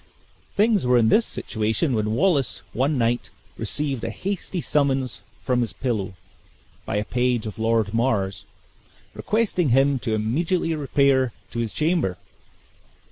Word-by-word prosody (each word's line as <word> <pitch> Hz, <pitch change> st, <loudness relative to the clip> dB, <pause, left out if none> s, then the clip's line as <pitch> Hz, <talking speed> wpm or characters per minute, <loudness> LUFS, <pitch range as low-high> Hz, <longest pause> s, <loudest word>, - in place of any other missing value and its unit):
Things 210 Hz, -, +3 dB
were 125 Hz, 0 st, +5 dB
in 110 Hz, -2 st, +4 dB
this 230 Hz, -, +4 dB
situation 110 Hz, +6 st, -1 dB
when 110 Hz, -1 st, 0 dB
Wallace, 145 Hz, -5 st, +1 dB
one 140 Hz, +4 st, +1 dB
night, 120 Hz, 0 st, 0 dB, 0.3 s
received 140 Hz, -5 st, -2 dB
a -, -, -1 dB
hasty 190 Hz, -1 st, -3 dB
summons 135 Hz, -5 st, 0 dB, 0.2 s
from 125 Hz, -2 st, +1 dB
his 115 Hz, -5 st, -2 dB
pillow 100 Hz, -4 st, -2 dB, 0.7 s
by -, -, -2 dB
a 105 Hz, +1 st, 0 dB
page 125 Hz, -1 st, 0 dB
of 110 Hz, 0 st, -6 dB
Lord 110 Hz, -2 st, +1 dB
Mar's, 110 Hz, -5 st, 0 dB, 0.7 s
requesting 210 Hz, -8 st, 0 dB
him 135 Hz, +2 st, +3 dB
to 115 Hz, -3 st, -1 dB
immediately 165 Hz, -, 0 dB
repair 140 Hz, -4 st, +2 dB, 0.2 s
to 120 Hz, -, -4 dB
his 115 Hz, -2 st, -1 dB
chamber. 155 Hz, -, 0 dB
125 Hz, 135 wpm, -24 LUFS, 110-150 Hz, 0.7 s, were